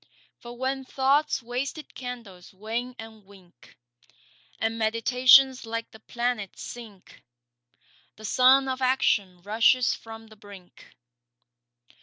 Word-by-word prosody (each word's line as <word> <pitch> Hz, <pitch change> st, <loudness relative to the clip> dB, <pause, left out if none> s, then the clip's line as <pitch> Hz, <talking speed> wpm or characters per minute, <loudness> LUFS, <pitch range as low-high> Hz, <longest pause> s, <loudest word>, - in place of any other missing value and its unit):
For 240 Hz, 0 st, -11 dB
when 265 Hz, +1 st, -2 dB
Thought's 270 Hz, +2 st, +1 dB
wasted 260 Hz, +6 st, -5 dB
candles 230 Hz, -8 st, -9 dB
wane 230 Hz, +5 st, -5 dB
and 220 Hz, -1 st, -11 dB
wink, 190 Hz, -8 st, -20 dB, 0.8 s
And 225 Hz, 0 st, -1 dB
meditations 250 Hz, +4 st, +4 dB
like 230 Hz, 0 st, -5 dB
the 220 Hz, -, -15 dB
planets 235 Hz, -4 st, -4 dB
sink, 220 Hz, -6 st, -11 dB, 0.9 s
The 215 Hz, -, -12 dB
sun 260 Hz, +4 st, +4 dB
of 260 Hz, 0 st, -3 dB
Action 205 Hz, -8 st, +1 dB
rushes 230 Hz, +5 st, +3 dB
from 225 Hz, 0 st, -11 dB
the 215 Hz, -, -15 dB
brink. 200 Hz, -3 st, -16 dB
230 Hz, 110 wpm, -26 LUFS, 215-255 Hz, 0.9 s, meditations